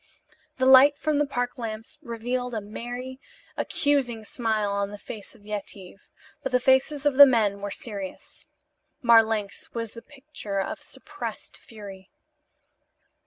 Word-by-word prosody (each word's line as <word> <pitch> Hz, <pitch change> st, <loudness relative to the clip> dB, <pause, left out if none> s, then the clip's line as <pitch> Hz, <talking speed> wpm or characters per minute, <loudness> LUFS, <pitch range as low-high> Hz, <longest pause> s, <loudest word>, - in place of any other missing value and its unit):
The 260 Hz, -, +1 dB
light 265 Hz, +2 st, +8 dB
from 300 Hz, 0 st, 0 dB
the 295 Hz, -, +2 dB
park 245 Hz, -2 st, -3 dB
lamps 225 Hz, +4 st, -6 dB
revealed 245 Hz, -1 st, -3 dB
a -, -, 0 dB
merry, 245 Hz, +5 st, -7 dB, 0.4 s
accusing 260 Hz, -6 st, 0 dB
smile 215 Hz, -2 st, -1 dB
on 200 Hz, 0 st, -1 dB
the 205 Hz, -, -8 dB
face 205 Hz, +2 st, -9 dB
of 205 Hz, -3 st, -20 dB
Yetive, 200 Hz, -2 st, -6 dB, 0.3 s
but 270 Hz, -, -3 dB
the 250 Hz, -, +3 dB
faces 265 Hz, +3 st, +2 dB
of 285 Hz, -3 st, +2 dB
the 285 Hz, -, +12 dB
men 210 Hz, -5 st, +2 dB
were 205 Hz, -, -3 dB
serious. 200 Hz, -3 st, -7 dB, 0.6 s
Marlanx 225 Hz, -3 st, +3 dB
was 230 Hz, -2 st, -3 dB
the 230 Hz, -, -10 dB
picture 270 Hz, -9 st, -6 dB
of 190 Hz, -, -3 dB
suppressed -, -, -8 dB
fury. 200 Hz, -4 st, -12 dB
230 Hz, 140 wpm, -26 LUFS, 205-260 Hz, 0.6 s, the